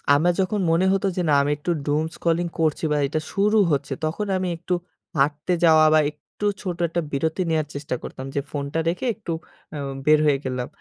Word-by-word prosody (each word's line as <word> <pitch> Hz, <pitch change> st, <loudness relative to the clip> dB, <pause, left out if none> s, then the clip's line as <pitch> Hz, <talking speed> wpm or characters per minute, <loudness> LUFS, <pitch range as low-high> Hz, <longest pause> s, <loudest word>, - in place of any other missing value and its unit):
আমার 175 Hz, +4 st, +3 dB
যখন 205 Hz, +3 st, 0 dB
মনে 175 Hz, +3 st, +3 dB
হতো 195 Hz, 0 st, +1 dB
যে -, -, +2 dB
না 145 Hz, -, +4 dB
আমি 145 Hz, +1 st, 0 dB
একটু 175 Hz, +4 st, -2 dB, 0.2 s
doom 150 Hz, +2 st, +2 dB
scrolling 170 Hz, +1 st, 0 dB
করছি 160 Hz, 0 st, +1 dB
বা 150 Hz, -, +2 dB
এটা 155 Hz, +3 st, -1 dB
শুরু 210 Hz, +2 st, +3 dB
হচ্ছে 140 Hz, 0 st, 0 dB
তখন 165 Hz, +7 st, -2 dB
আমি 185 Hz, 0 st, -1 dB
একটু 175 Hz, +2 st, -3 dB, 0.4 s
হাঁটতে 145 Hz, +5 st, +1 dB
যাওয়া 155 Hz, -1 st, +6 dB
বা 155 Hz, -, +6 dB
একটু 150 Hz, +7 st, -9 dB, 0.2 s
ছোট 180 Hz, -3 st, -3 dB
একটা 170 Hz, +1 st, -1 dB
বিরতি 160 Hz, +6 st, 0 dB
নেওয়ার 155 Hz, -2 st, +1 dB
চেষ্টা 145 Hz, -2 st, -3 dB
করতাম। 130 Hz, -, -7 dB
যে 140 Hz, -, +1 dB
ফোনটা 145 Hz, +2 st, -2 dB
রেখে 180 Hz, +9 st, -3 dB
একটু 205 Hz, -6 st, -6 dB, 0.4 s
উম 140 Hz, -2 st, -4 dB
বের 155 Hz, 0 st, +6 dB
হয়ে 145 Hz, -2 st, +3 dB
গেলাম। 125 Hz, -1 st, -2 dB
155 Hz, 200 wpm, -23 LUFS, 145-175 Hz, 0.4 s, যাওয়া